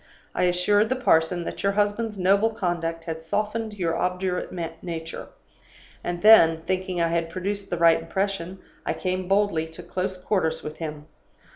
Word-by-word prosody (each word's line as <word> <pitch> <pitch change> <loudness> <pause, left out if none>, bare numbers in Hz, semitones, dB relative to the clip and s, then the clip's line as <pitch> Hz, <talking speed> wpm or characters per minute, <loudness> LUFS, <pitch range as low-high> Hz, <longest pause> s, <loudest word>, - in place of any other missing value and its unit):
I - - +1
assured 205 +4 +3
the 260 - +1
parson 175 -7 +2
that - - -5
your 200 0 +1
husband's 205 +1 0
noble 200 +4 +3
conduct 170 -5 -2
had 160 -1 -5
softened 210 +5 -2
your 170 -4 -1
obdurate 180 0 -1 0.3
nature; 165 -1 -6 0.8
and 175 +1 -4
then, 165 -7 +7
thinking 185 0 -1
I 165 0 +2
had 165 0 0
produced 195 +3 -4
the 175 - -2
right 165 -1 +5
impression, 190 +1 -2 0.3
I - - -1
came 185 0 -2
boldly 195 -5 +2
to 160 - -11
close 185 0 -3
quarters 180 -4 -1
with 150 +1 -7
him. 150 -2 -6
180 Hz, 160 wpm, -25 LUFS, 165-200 Hz, 0.8 s, then